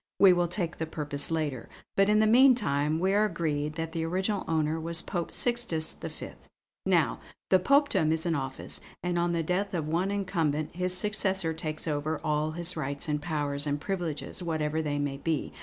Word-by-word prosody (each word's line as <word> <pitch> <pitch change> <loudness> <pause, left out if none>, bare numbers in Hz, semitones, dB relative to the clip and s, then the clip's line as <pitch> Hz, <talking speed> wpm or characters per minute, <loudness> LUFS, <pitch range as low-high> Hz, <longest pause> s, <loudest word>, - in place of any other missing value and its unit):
We 195 -2 +8
will 175 0 +2
take 170 -1 -3
the 160 - -2
purpose 145 -2 -2
later, 150 -7 -2 0.3
but 195 +1 +4
in 210 - +5
the 215 - +5
meantime 215 - +4
we 190 +3 +1
are 205 +1 +4
agreed 155 -5 -1
that 165 0 -3
the 165 -1 -2
original 190 +5 0
owner 160 0 +1
was 165 +1 -1
Pope 175 -3 -3
Sixtus 235 -10 0
V. - - -7 0.6
Now, - - +2 0.3
the 185 - +7
Popedom 200 - +3
is 160 +1 -1
an 170 - +1
office, 135 -3 -4 0.2
and 175 -1 0
on 170 0 +1
the 165 -1 0
death 185 +4 -1
of 160 -3 -2
one 170 +5 0
incumbent 165 -7 -1
his 180 0 +1
successor 190 -4 0
takes 155 -1 -4
over 155 +1 -1
all 150 +1 0
his 170 +2 -3
rights 140 +4 -2
and 150 -1 -1
powers 145 -2 -2
and 145 0 0
privileges 175 -2 -3
whatever 160 -2 -1
they 145 -2 -1
may 145 -1 -2
be. 160 +1 -2
165 Hz, 190 wpm, -29 LUFS, 150-185 Hz, 0.6 s, We